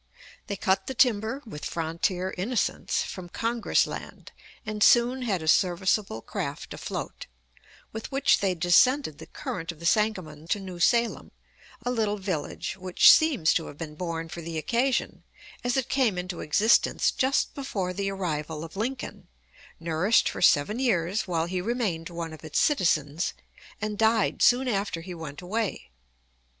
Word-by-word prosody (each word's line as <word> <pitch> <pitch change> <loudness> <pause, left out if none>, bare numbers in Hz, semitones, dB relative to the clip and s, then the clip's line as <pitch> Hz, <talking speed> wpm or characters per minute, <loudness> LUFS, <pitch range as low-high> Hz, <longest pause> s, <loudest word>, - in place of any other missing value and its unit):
They 200 - -3
cut 190 0 0
the 265 - -4
timber, 235 +2 +2
with 150 -10 -9
frontier 170 +3 -2
innocence, 210 +5 -1
from 180 -2 -7
"Congress 230 +3 +1
land," - - -8 0.3
and 215 -1 -5
soon 245 +4 +5
had 200 -9 -1
a - - -6
serviceable 180 - +2
craft - - -5
afloat, - - -6 0.7
with 220 0 -6
which 275 +1 +3
they 195 -3 0
descended 180 - +3
the - - -10
current 170 -1 -5
of 165 - -15
the 170 - -8
Sangamon 175 -7 0
to 205 +4 0
New 185 -3 -8
Salem, 235 +6 +2 0.6
a 245 - 0
little 215 -4 0
village 185 -5 -4
which 185 -1 +6
seems 290 - +4
to 165 - -1
have 145 - -10
been 155 -2 -6
born 165 0 -4
for 170 +1 -7
the 165 0 -5
occasion, 240 - 0 0.4
as 245 +1 0
it 265 - 0
came 245 -9 +1
into 180 -1 -4
existence 205 +9 +3
just 265 +1 +1
before 200 -10 -3
the 195 +1 -2
arrival 160 -5 -3
of 165 +2 -10
Lincoln, 250 +6 -4 0.5
nourished 165 +6 +2
for - - -4
seven 175 +8 +4
years 195 -5 0
while 165 -2 0
he 180 +1 -2
remained 195 -7 -2
one 170 -2 -5
of 155 - -12
its 155 - -1
citizens, 165 - +1 0.4
and 210 -1 -4
died 220 -1 +2
soon 255 +2 +4
after 200 -6 -1
he 180 +2 -8
went 160 -1 -8
away. 195 - -3
190 Hz, 160 wpm, -27 LUFS, 165-230 Hz, 0.7 s, which